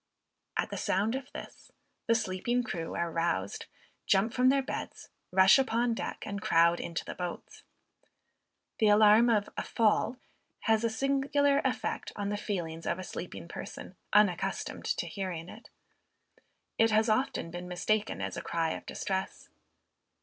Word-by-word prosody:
At - - -1
the - - -3
sound 205 +5 +1
of 265 +1 -5
this, - - -10 0.4
the 230 - +4
sleeping 225 +4 0
crew 165 -7 -4
are 170 -1 -1
roused, 165 - -1 0.4
jump 205 +5 +3
from 255 0 +4
their 275 0 +3
beds, - - -6 0.2
rush 190 +6 +6
upon 240 -2 +1
deck, - - -5
and 200 -1 -4
crowd 170 0 +4
into 170 - -4
the - - -5
boats. 180 -1 -6 1.2
The 220 - +4
alarm 215 +3 +6
of 210 -3 +2
"a - - 0
fall," 230 +2 +1 0.4
has 220 0 +2
a 230 - +2
singular 275 +3 +2
effect 250 -4 -2
on 200 -1 -2
the 205 - -1
feelings 175 -6 -4
of - - 0
a 185 - -6
sleeping 175 -1 -7
person, 180 - -8 0.2
unaccustomed 205 -4 +1
to - - -1
hearing 180 -4 -5
it. 225 - -12 1.1
It 225 0 +5
has 220 +1 +3
often 215 -6 0
been 175 +1 -6
mistaken 205 +4 -1
as - - -3
a - - -4
cry 165 -1 -1
of - - -6
distress. 190 0 -4
210 Hz, 155 wpm, -30 LUFS, 180-230 Hz, 1.2 s, rush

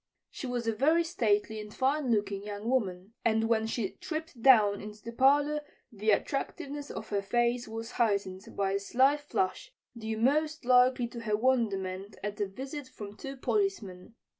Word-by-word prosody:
She 265 - -6
was 245 -1 -2
a 225 - +1
very 310 +9 +3
stately 220 - 0
and 210 0 -10
fine 270 +3 0
looking 205 -3 0
young 205 +1 -6
woman, 200 -5 -1
and 225 -1 +2
when 220 -1 +2
she 225 -3 -2
tripped 315 -6 -6
down 215 -6 +6
into 210 0 -10
the 230 - -6
parlor 290 +4 +3 0.3
the 215 -1 -2
attractiveness 280 +5 -1
of 220 - -7
her 200 -1 0
face 240 +4 0
was 225 +1 -6
heightened 200 -4 0
by 195 -1 +1
a 200 - +1
slight 265 +8 +3
flush, 295 - -2 0.2
due 220 -1 -4
most 300 +5 +1
likely 250 0 +4
to 235 - -7
her 215 -2 0
wonderment 205 -5 0
at 210 0 -4
a 205 - +1
visit 265 +7 -7
from 205 -4 -9
two 270 +4 -7
policemen. 230 - -2
230 Hz, 170 wpm, -30 LUFS, 205-265 Hz, 0.3 s, down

